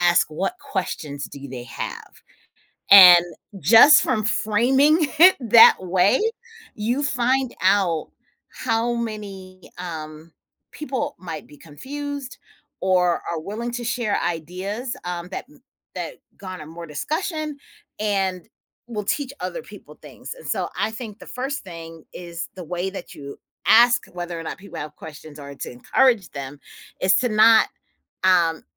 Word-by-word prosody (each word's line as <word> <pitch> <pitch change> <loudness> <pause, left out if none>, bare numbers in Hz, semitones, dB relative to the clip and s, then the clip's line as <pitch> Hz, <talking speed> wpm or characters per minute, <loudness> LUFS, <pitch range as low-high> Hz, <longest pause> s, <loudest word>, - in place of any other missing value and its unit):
ask 175 0 +4
what 190 - -2
questions 160 - -4
do 140 0 -10
they 125 -2 -7
have, - - -7 0.8
and 180 -3 +11 0.4
just 225 - +8
from 215 - 0
framing 260 +9 +3 0.2
it 365 +3 +8
that 230 -2 +7
way, 185 - +2 0.5
you 240 +7 -1
find 260 -1 0
out 185 -5 +2 0.4
how 230 0 -1
many, 200 -5 -7
um, 160 -2 -8 0.4
people 290 0 -4
might 165 -4 -8
be 145 - -15
confused 280 - -7 0.4
or 180 -2 +2
are 165 - -3
willing 220 +8 -5
to 240 0 -5
share 230 -3 -1
ideas, 185 - -4
um, 175 0 -5
that - - -6 0.5
that - - -6 0.2
garner 185 -5 -8
more 170 +1 -9
discussion 305 - -3 0.4
and 195 -4 -1 0.4
will 210 -3 -4
teach 275 +6 -2
other - - -5
people - - -14
things, - - -10
and, - - -12
so, - - -1
I - - 0
think 220 -2 -8
the - - -13
1st 270 +3 -4
thing 165 -2 -10
is 170 -1 -7
the 180 - -7
way 180 +3 -3
that 190 -2 -9
you 140 -1 -10 0.3
ask 240 +2 +6
whether 175 -1 -5
or - - -6
not - - -6
people 200 +1 -10
have 150 0 -7
questions 155 -1 -11
or 140 0 -9
to - - -7
encourage 210 - +2
them 140 0 -8 0.4
is 185 0 +4
to 245 - +1
not, 220 +1 +6 0.6
um, 170 -3 +3
190 Hz, 140 wpm, -22 LUFS, 170-240 Hz, 0.8 s, and